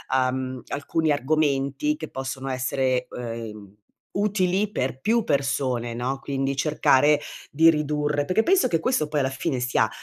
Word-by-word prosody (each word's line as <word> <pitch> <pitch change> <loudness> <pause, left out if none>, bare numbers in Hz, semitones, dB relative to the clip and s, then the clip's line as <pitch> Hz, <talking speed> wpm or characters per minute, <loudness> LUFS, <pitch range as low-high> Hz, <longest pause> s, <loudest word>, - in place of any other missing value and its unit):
uhm, 130 0 -1
alcuni 150 +2 0
argomenti 145 - +1
che - - -7
possono 135 0 -5
essere, 130 0 0
uhm, 110 -4 -7 0.4
utili 200 0 +1
per 130 - -2
più 225 +7 +2
persone, 130 -4 0
no, 125 +3 -2
quindi 135 0 -2
cercare 150 0 +3 0.3
di 165 +3 +5
ridurre 150 -1 0
perché 185 +8 +2
penso 375 +5 +4
che 165 - +1
questo 165 - +1
poi 150 -1 0
alla 130 - 0
fine 135 0 -2
sia, 120 -3 +2
140 Hz, 145 wpm, -24 LUFS, 130-155 Hz, 0.4 s, di